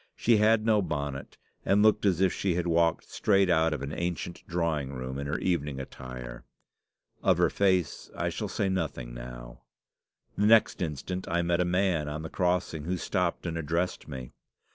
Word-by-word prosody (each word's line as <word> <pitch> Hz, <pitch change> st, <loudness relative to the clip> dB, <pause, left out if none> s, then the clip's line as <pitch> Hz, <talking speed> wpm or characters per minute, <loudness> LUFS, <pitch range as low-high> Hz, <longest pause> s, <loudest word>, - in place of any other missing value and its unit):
She 115 Hz, -1 st, +3 dB
had 110 Hz, +1 st, +4 dB
no 110 Hz, -2 st, +4 dB
bonnet, 70 Hz, -5 st, -4 dB, 0.3 s
and 100 Hz, +2 st, +3 dB
looked 110 Hz, -1 st, +4 dB
as 90 Hz, -3 st, +2 dB
if 95 Hz, -2 st, +3 dB
she 95 Hz, -4 st, 0 dB
had 90 Hz, -1 st, -1 dB
walked 85 Hz, -1 st, +2 dB
straight 100 Hz, -3 st, +3 dB
out 80 Hz, -1 st, +3 dB
of 75 Hz, -3 st, -3 dB
an 70 Hz, +2 st, -4 dB
ancient 85 Hz, 0 st, -3 dB
drawing 80 Hz, -5 st, -1 dB
room 65 Hz, +1 st, -5 dB
in 70 Hz, -, -4 dB
her 75 Hz, -, -1 dB
evening 75 Hz, -6 st, -1 dB
attire. 65 Hz, -2 st, -8 dB, 0.8 s
Of -, -, +3 dB
her -, -, +3 dB
face 95 Hz, -5 st, +1 dB
I -, -, 0 dB
shall -, -, -4 dB
say 100 Hz, -, -1 dB
nothing 80 Hz, -10 st, -2 dB
now. -, -, -9 dB, 0.7 s
The 105 Hz, -, +2 dB
next 110 Hz, -2 st, +5 dB
instant 90 Hz, +3 st, -3 dB
I 85 Hz, +1 st, +1 dB
met 85 Hz, +1 st, +1 dB
a -, -, +2 dB
man 90 Hz, -4 st, +1 dB
on 75 Hz, +2 st, -5 dB
the 80 Hz, -, -5 dB
crossing, 90 Hz, -4 st, 0 dB
who 90 Hz, +2 st, -1 dB
stopped 90 Hz, 0 st, -1 dB
and 85 Hz, -2 st, -2 dB
addressed 85 Hz, +3 st, -2 dB
me. 65 Hz, -2 st, -7 dB
85 Hz, 185 wpm, -28 LUFS, 70-95 Hz, 0.8 s, next